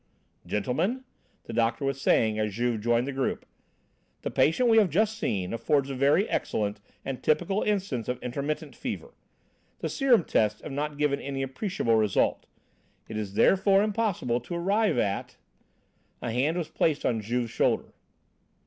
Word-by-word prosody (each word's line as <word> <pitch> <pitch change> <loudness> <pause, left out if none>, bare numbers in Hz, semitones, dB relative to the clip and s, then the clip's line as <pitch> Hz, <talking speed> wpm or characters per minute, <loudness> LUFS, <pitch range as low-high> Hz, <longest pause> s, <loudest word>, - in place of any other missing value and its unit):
"Gentlemen," 165 - -1 0.4
the - - -8
doctor 115 +3 +1
was 135 0 -2
saying 110 -4 +3
as 105 -2 -1
Juve 120 -2 0
joined 120 +2 +2
the 140 - -3
group, 135 -1 -2 0.8
"the - - -2
patient 200 +11 +3
we 225 -1 +6
have 205 -4 +3
just 215 +7 +1
seen 100 - -2
affords 140 +3 +1
a - - -4
very 140 +10 +3
excellent 105 -1 -1 0.3
and 135 -2 -4
typical 175 +6 +1
instance 190 - -1
of 125 - -1
intermittent 140 +5 -3
fever. - - -6 0.6
The - - -3
serum 255 - +3
tests 105 -6 +1
have - - -7
not 145 +1 -3
given 145 -1 +1
any 135 -1 -3
appreciable 135 - 0
result; 105 -3 +1 0.6
it 110 - -7
is 105 -2 -4
therefore 195 - +4
impossible 205 - 0
to 150 +9 -7
arrive 200 - +1
at 100 -4 -1 0.4
" - - -42
A 115 - -2
hand 140 +8 +1
was 170 -3 -3
laid 155 -3 +2
on 115 -3 +1
Juve's 120 +2 -2
shoulder. - - 0
135 Hz, 160 wpm, -27 LUFS, 115-185 Hz, 0.8 s, we